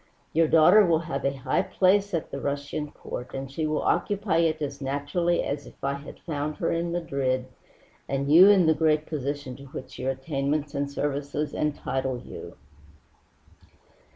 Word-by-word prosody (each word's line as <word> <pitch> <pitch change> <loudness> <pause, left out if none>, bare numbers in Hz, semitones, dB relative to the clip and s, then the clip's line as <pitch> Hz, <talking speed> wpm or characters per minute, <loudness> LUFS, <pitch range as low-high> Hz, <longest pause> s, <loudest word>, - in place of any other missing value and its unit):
Your 165 0 +4
daughter 175 +7 +7
will 165 -3 +3
have 140 -2 -3
a 135 0 0
high 130 0 +1
place 200 +2 +2
at 165 - -3
the - - -5
Russian 145 +1 -3
Court, 125 -3 -7
and 135 0 -5
she 155 +3 -2
will 155 0 -1
occupy 200 -4 +1
it 165 -2 +2
as 145 -1 -4
naturally 145 +6 0
as 140 0 -4
if - - -14
I 140 0 +1
had 140 +1 -9
found 150 -2 -3
her - - -1
in 170 +1 -1
Madrid 140 -7 -1 0.6
and 140 +1 -1
you 185 +5 +9
in 195 -4 +6
the 160 - +5
great 155 -1 +2
position 145 -3 -4
to 140 - -12
which 130 0 -9
your 130 - -1
attainments 140 +2 -2
and 140 0 -1
services 145 +1 -2
entitle 135 -3 -1
you." - - -9
145 Hz, 170 wpm, -26 LUFS, 140-165 Hz, 0.6 s, you